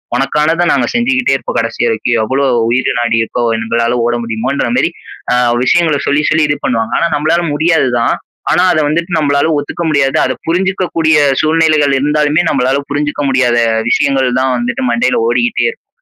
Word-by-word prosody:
உனக்கானத 150 +6 0
நாங்க - - +1
செஞ்சுகிட்டே 255 +2 +1
இருப்போம் - - -4
கடைசி - - -3
வரைக்கும். 445 - -1
எவ்ளோ 135 +5 -1 0.2
உயிர் 125 +2 0
நாடி 115 -1 0
இருக்கோ! 120 +2 -3
எங்களால 115 +2 -1
ஓட 120 0 0
முடியுமோன்றமாரி 120 +4 -1 0.4
அ 125 - +3 0.3
விஷயங்கள 160 +1 +2
சொல்லி, 145 +1 +2
சொல்லி 155 0 +2
இது 145 - 0
பண்ணுவாங்க. 115 -2 -1
ஆனா, - - +1
நம்பளால 160 +4 +1
முடியாது 160 -2 +1
தான். 115 - +1 0.4
ஆனா 180 - +3
அத 155 - +1
வந்துட்டு 170 +4 -2
நம்பளால 145 0 +1
ஒத்துக்க 145 +4 -4
முடியாது. 140 -3 +1
அத 130 - 0
புரிஞ்சுக்க 185 +3 -1
கூடிய 160 -1 +3 0.2
சூழ்நிலைகள் 155 -2 +2
இருந்தாலுமே 150 +3 +1
நம்பளால 130 0 +1
புரிஞ்சுக்க 145 +1 -2
முடியாத 130 -3 +1 0.3
விஷயங்கள் 135 -2 +1
தான் 130 0 0
வந்துட்டு 125 +2 -3
மண்டையில 120 +2 +1
ஓடிகிட்டே 120 0 0
இருக்கும். - - -7
145 Hz, 160 wpm, -13 LUFS, 125-160 Hz, 0.4 s, அ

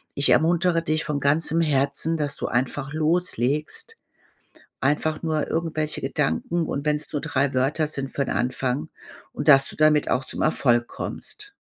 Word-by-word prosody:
Ich 140 - +2
ermuntere 170 +1 +3
dich 155 -1 0
von 150 -1 -2
ganzem 160 +3 +2
Herzen, 140 +2 0
dass 145 -2 -2
du - - -3
einfach 135 +3 -1
loslegst, 155 - -1 0.8
einfach 150 +3 0
nur 155 -2 -1
irgendwelche 160 -2 -1
Gedanken, 165 - -1
und 140 0 -3
wenn's 150 +1 -1
nur 150 - -1
3 140 0 0
Wörter 140 +5 +1
sind 140 -2 -3
für 140 - -1
'n - - -3
Anfang, 130 +4 -1 0.4
und 145 - -4
dass 135 -1 +7
du - - -7
damit 155 -1 +3
auch 130 +1 +1
zum - - -4
Erfolg 120 -6 +2
kommst. 415 -1 -8
150 Hz, 160 wpm, -24 LUFS, 135-160 Hz, 0.8 s, dass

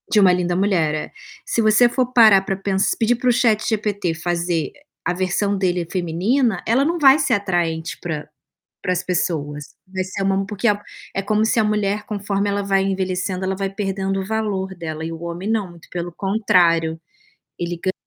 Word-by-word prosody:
De 215 - +4
Uma 190 -2 +6
Linda 180 -1 0
Mulher, 180 -5 +2
é. 150 - -5 0.3
Se 230 - 0
você 215 +2 +5
for 250 0 0
parar 220 -5 +7
para 195 0 -2
pens 195 0 0
pedir 235 +2 +3
para 250 +1 0
o - - +6
ChatGPT 215 -6 +1
fazer 170 -1 -1 0.3
a 180 - +1
versão 190 +3 0
dele 180 -2 0
feminina, 190 +6 0
ela 245 +5 +3
não 335 +3 0
vai 275 0 +7
ser 270 -5 +1
atraente 175 -5 -1
para 155 -3 -4 0.5
para 185 - +1
as 180 0 -2
pessoas. 150 -5 -2 0.2
Vai 190 0 -3
ser 190 +1 -4
uma 195 0 +2
m 195 - 0
porque 210 +2 -1
é 210 - +4 0.4
é 195 - 0
como 215 +2 +1
se 225 - +2
a - - +4
mulher, 210 -1 0
conforme 205 -1 -2
ela 200 0 -1
vai 195 -1 +2
envelhecendo, 190 -1 -2
ela 190 0 -1
vai 195 0 -2
perdendo 195 -1 -2
o - - -5
valor 200 -3 -2
dela. 160 -2 -5
E 165 - -4
o 165 0 -8
homem 170 +3 -5
não, 215 -4 0
muito 170 -1 -16
pelo 175 0 -4
contrário, 170 -5 +2 0.6
ele 175 0 -3
ga 185 - 0
195 Hz, 195 wpm, -21 LUFS, 175-210 Hz, 0.6 s, parar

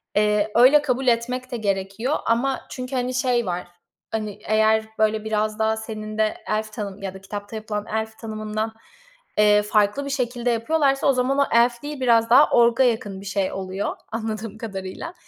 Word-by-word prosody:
eee, 210 0 +2
öyle 260 +5 +7
kabul 260 -2 -1
etmek 250 +2 0
de 240 - -2
gerekiyor 200 +5 -1
ama 250 +4 +1
çünkü, 255 +1 -5
hani, 250 0 -1
şey 250 -2 +1
var, 180 -1 -3 0.4
hani, 215 -2 -4
eğer, 220 0 +3 0.2
böyle, 215 0 +2
biraz 215 0 -1
daha 220 0 +1
senin 215 -1 -6
de 215 0 +1
elf 215 0 -2
tanım 200 -1 -6
ya 195 -1 -4
da 190 - -11
kitapta 205 +2 -7
yapılan 215 -1 -4
elf 220 0 -3
tanımından, 215 0 -4 0.6
eee, 210 0 +5
farklı 210 +6 +1
bir - - -4
şekilde 245 -2 -1
yapıyorlarsa 275 +4 +1
o 275 - +5
zaman 255 +2 +1
o - - +6
elf 235 +1 +3
değil, 295 -2 -6
biraz 230 -2 +4
daha 275 +5 +7
ork'a 235 +2 +5
yakın 220 -5 -1
bir - - -11
şey 200 -1 -1
oluyor 190 +1 -3 0.2
anladığım 220 -1 -4
kadarıyla. 195 - -6
220 Hz, 175 wpm, -23 LUFS, 210-245 Hz, 0.6 s, öyle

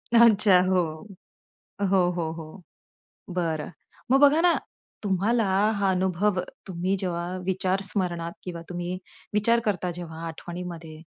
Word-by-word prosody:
अच्छा. 215 -5 +7
हो. 185 -1 +3 1.1
हो, 190 -1 +5 0.2
हो, 160 -2 -1
हो, 165 +3 -10 0.7
बरं. 165 -4 -1 0.4
मग 270 +1 +5
बघा 290 +2 +6
ना, 345 0 +5 0.5
तुम्हाला 210 +4 +1 0.3
हा 200 -1 +2
अनुभव 185 +1 +1 0.3
तुम्ही 185 +1 -1
जेव्हा 175 -1 -2
विचार 190 +1 0
स्मरणात 175 -4 -2
किंवा 170 -2 -6
तुम्ही 175 +1 -4 0.4
विचार 230 +3 +3
करता 185 -4 0
जेव्हा 165 -2 -7
आठवणीमध्ये 165 -1 -7
185 Hz, 120 wpm, -26 LUFS, 170-200 Hz, 1.1 s, अच्छा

